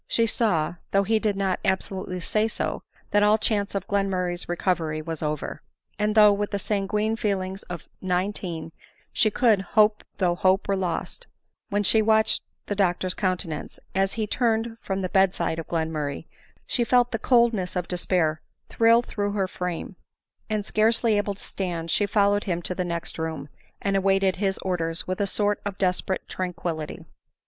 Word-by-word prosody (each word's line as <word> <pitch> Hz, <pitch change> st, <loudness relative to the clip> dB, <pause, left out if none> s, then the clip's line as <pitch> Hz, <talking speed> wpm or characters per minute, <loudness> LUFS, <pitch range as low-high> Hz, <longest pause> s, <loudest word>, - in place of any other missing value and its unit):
She 230 Hz, -, +2 dB
saw, 180 Hz, -8 st, +1 dB
though 195 Hz, 0 st, +3 dB
he 220 Hz, +2 st, +2 dB
did 210 Hz, -2 st, 0 dB
not 195 Hz, -2 st, 0 dB
absolutely 190 Hz, -1 st, -1 dB
say 215 Hz, +5 st, +1 dB
so, 225 Hz, -, -3 dB, 0.3 s
that 205 Hz, -, +4 dB
all 210 Hz, +1 st, +5 dB
chance 205 Hz, -2 st, 0 dB
of 195 Hz, -, -2 dB
Glenmurray's 185 Hz, -3 st, -1 dB
recovery 170 Hz, -3 st, 0 dB
was 160 Hz, 0 st, -5 dB
over; 150 Hz, -1 st, -3 dB, 0.4 s
and 210 Hz, +1 st, +1 dB
though 210 Hz, -1 st, +8 dB
with 205 Hz, 0 st, -1 dB
the 200 Hz, -, -1 dB
sanguine 210 Hz, +2 st, 0 dB
feelings 195 Hz, -3 st, -2 dB
of 175 Hz, -3 st, -6 dB
nineteen 180 Hz, -3 st, -2 dB, 0.4 s
she 220 Hz, -, +3 dB
could 220 Hz, -2 st, +3 dB
" -, -, -21 dB
hope 210 Hz, 0 st, +5 dB
though 180 Hz, -3 st, +2 dB
hope 185 Hz, +3 st, +2 dB
were 200 Hz, -, +2 dB
lost," 190 Hz, -, -3 dB, 0.4 s
when 205 Hz, +1 st, +1 dB
she 220 Hz, +3 st, +4 dB
watched 220 Hz, 0 st, +3 dB, 0.2 s
Dr 185 Hz, -2 st, 0 dB
's -, -, -1 dB
countenance 180 Hz, -6 st, -3 dB, 0.2 s
as 195 Hz, +1 st, +1 dB
he 220 Hz, -2 st, -1 dB
turned 225 Hz, +1 st, 0 dB
from 195 Hz, 0 st, -2 dB
the 185 Hz, -, -1 dB
bed 190 Hz, -1 st, +3 dB
side 160 Hz, -, -1 dB
of 165 Hz, -, -6 dB
Glenmurray, 160 Hz, -3 st, -2 dB, 0.4 s
she 240 Hz, -, 0 dB
felt 245 Hz, 0 st, +3 dB
the 225 Hz, -, -1 dB
coldness 235 Hz, -7 st, +2 dB
of 180 Hz, -1 st, -1 dB
despair 175 Hz, -3 st, 0 dB, 0.3 s
thrill 230 Hz, +1 st, +4 dB
through 205 Hz, -3 st, -2 dB
her 195 Hz, -2 st, 0 dB
frame; 180 Hz, +1 st, -5 dB, 0.5 s
and, 215 Hz, -2 st, -1 dB
scarcely 220 Hz, +1 st, +3 dB
able 205 Hz, -1 st, 0 dB
to -, -, -11 dB
stand, 170 Hz, -4 st, -3 dB
she 205 Hz, -, +2 dB
fol 200 Hz, -1 st, +3 dB
lowed 205 Hz, 0 st, 0 dB
him 175 Hz, -3 st, 0 dB
into 175 Hz, +1 st, -4 dB
the 180 Hz, -, -2 dB
next 170 Hz, -2 st, -4 dB
room, 160 Hz, -3 st, -4 dB, 0.3 s
and 195 Hz, -1 st, 0 dB
awaited 195 Hz, -1 st, +2 dB
his 195 Hz, 0 st, 0 dB
orders 170 Hz, -3 st, -1 dB
with 185 Hz, +2 st, -2 dB
a 200 Hz, -, +1 dB
sort 205 Hz, 0 st, 0 dB
of 200 Hz, -1 st, -4 dB
desperate 185 Hz, 0 st, 0 dB
tranquillity. 175 Hz, -4 st, -4 dB
195 Hz, 175 wpm, -25 LUFS, 180-210 Hz, 0.5 s, though